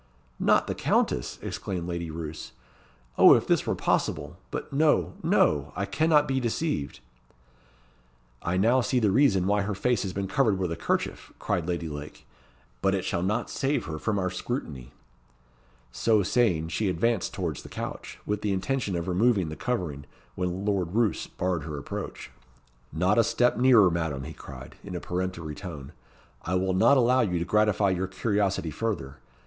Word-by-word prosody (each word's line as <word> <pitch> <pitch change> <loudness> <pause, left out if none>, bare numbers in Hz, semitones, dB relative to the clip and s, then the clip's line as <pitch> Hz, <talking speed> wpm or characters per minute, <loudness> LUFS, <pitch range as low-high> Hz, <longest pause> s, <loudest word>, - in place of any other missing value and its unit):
"Not - - +3
the - - -2
Countess!" - - 0
exclaimed 90 -2 -4
Lady 85 -1 -3
Roos. 80 -1 -7 0.7
"Oh, - - +9
if - - +1
this - - +1
were - - +1
possible! - - -1
But - - -6
no, 150 +2 +3
no! 75 0 +2
I 100 - -1
cannot 150 +8 +3
be 135 0 +1
deceived." 120 - -2 1.4
"I 90 +2 -1
now 120 +7 +4
see 125 - 0
the 110 -5 +3
reason 100 -6 +4
why 100 +1 +2
her 100 0 -2
face 120 +2 +1
has 95 - -3
been 95 +1 -3
covered 110 -4 +2
with 90 -3 -2
a - - -1
'kerchief," 85 - -2
cried 85 -2 -2
Lady 85 -2 -2
Lake. 75 0 -8 0.6
"But 95 0 +2
it 95 - -2
shall 85 - -1
not 105 +6 -1
save 140 +1 0
her 80 -1 -5
from 110 +3 -1
our 95 -2 -1
scrutiny." 80 - -5 1.0
So 105 - +2
saying, 90 -7 +1
she 100 +4 0
advanced 100 +3 0
towards 85 -7 -3
the - - -12
couch, - - -6
with 105 0 -2
the 105 -2 0
intention 100 0 -1
of 85 +1 -3
removing 95 -1 +2
the 80 - -6
covering, 80 - -3 0.3
when 90 +6 -3
Lord 95 -3 -1
Roos 115 -6 +1
barred 90 -2 -2
her 75 0 -6
approach. 70 - -6 0.6
"Not 95 +7 +2
a - - +6
step 125 +2 +2
nearer, 120 -7 +6
Madam," 80 -5 -2
he 80 +3 -7
cried, 65 -3 -11
in 95 -2 -7
a - - -2
peremptory 90 -4 -3
tone. 75 -5 -8 0.5
"I 95 - -2
will 95 0 +1
not 135 +9 +5
allow 125 +1 +4
you 90 -7 0
to 85 - -1
gratify 105 0 +2
your 95 +1 -1
curiosity 100 -3 0
further. 75 -9 -3
95 Hz, 175 wpm, -27 LUFS, 85-110 Hz, 1.4 s, Oh